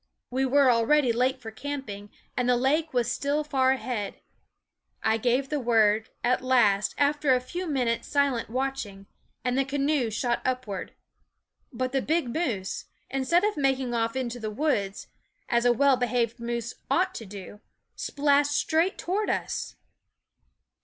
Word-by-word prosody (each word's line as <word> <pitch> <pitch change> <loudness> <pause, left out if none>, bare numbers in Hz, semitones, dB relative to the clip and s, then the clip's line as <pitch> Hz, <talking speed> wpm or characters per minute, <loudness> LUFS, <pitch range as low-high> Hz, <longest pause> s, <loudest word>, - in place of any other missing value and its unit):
We 265 +1 +1
were 275 0 +5
already 240 +2 +3
late 255 +3 +1
for 225 -3 -8
camping, 220 -6 -6 0.3
and 250 0 0
the 250 - +5
lake 305 +6 +1
was 245 -2 +1
still 290 +2 0
far 265 -3 +2
ahead. 240 -6 -3 0.9
I 220 0 +3
gave 250 +4 +1
the 300 - -1
word, 220 -3 +3
at 250 +1 +2
last, 210 -6 +3
after 290 -1 +3
a - - +2
few 345 +9 -5
minutes' 250 -6 0
silent 280 -6 +1
watch 270 +3 -1
ing, 195 -2 -12 0.4
and 250 0 +1
the 275 - +3
canoe 275 -2 0
shot 235 +2 -1
upward. 250 -7 -3 0.8
But 255 0 -2
the 270 0 +1
big 310 -6 0
moose, 230 - -2 0.3
instead 270 +7 +2
of 420 0 +1
making 265 -3 +1
off 230 0 0
into 245 -2 -3
the 220 -2 -3
woods, 210 -5 -1 0.4
as 235 0 +1
a 245 - +6
well 270 +2 +4
behaved 240 -1 0
moose 235 0 -3 0.2
ought 370 +1 +2
to 230 - -7
do, 200 +1 -10 0.3
splashed 290 0 +2
straight 325 +6 +1
toward 405 +4 -1
us. - - -2
255 Hz, 155 wpm, -27 LUFS, 230-280 Hz, 0.9 s, a